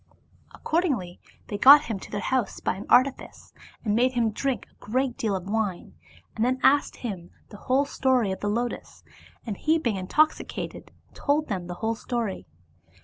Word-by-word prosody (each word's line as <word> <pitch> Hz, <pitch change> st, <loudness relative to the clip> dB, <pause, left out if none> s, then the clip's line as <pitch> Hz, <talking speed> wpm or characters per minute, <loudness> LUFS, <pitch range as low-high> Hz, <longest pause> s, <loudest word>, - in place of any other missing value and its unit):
Accordingly 270 Hz, -, -1 dB, 0.3 s
they 205 Hz, -, -5 dB
got 285 Hz, +5 st, +9 dB
him 220 Hz, -7 st, -4 dB
to -, -, -11 dB
their 205 Hz, -, -3 dB
house 250 Hz, -1 st, -1 dB
by -, -, -1 dB
an 190 Hz, -, -9 dB
artifice, 265 Hz, +1 st, +1 dB, 0.3 s
and 210 Hz, -, +1 dB
made 250 Hz, +2 st, +2 dB
him 235 Hz, -3 st, +1 dB
drink 265 Hz, +4 st, -2 dB
a -, -, -23 dB
great 255 Hz, +3 st, -1 dB
deal 215 Hz, -3 st, -1 dB
of 185 Hz, -1 st, -5 dB
wine, 205 Hz, -4 st, -2 dB, 0.4 s
and 220 Hz, -, -1 dB
then 255 Hz, +2 st, +1 dB
asked 285 Hz, +1 st, +4 dB
him 190 Hz, -8 st, -6 dB, 0.2 s
the 205 Hz, -, -12 dB
history 260 Hz, -4 st, +2 dB
of 190 Hz, -, -4 dB
the 205 Hz, -, -2 dB
lotus, 235 Hz, +3 st, -4 dB, 0.4 s
and 215 Hz, -4 st, -3 dB
he 320 Hz, +1 st, +2 dB
being 235 Hz, -10 st, -1 dB
intoxicated 300 Hz, +12 st, -1 dB, 0.2 s
told 300 Hz, +1 st, 0 dB
them 185 Hz, -4 st, -3 dB
the 175 Hz, -, -6 dB
whole 225 Hz, -, +1 dB
story. 225 Hz, -, -4 dB
235 Hz, 170 wpm, -26 LUFS, 205-265 Hz, 0.4 s, got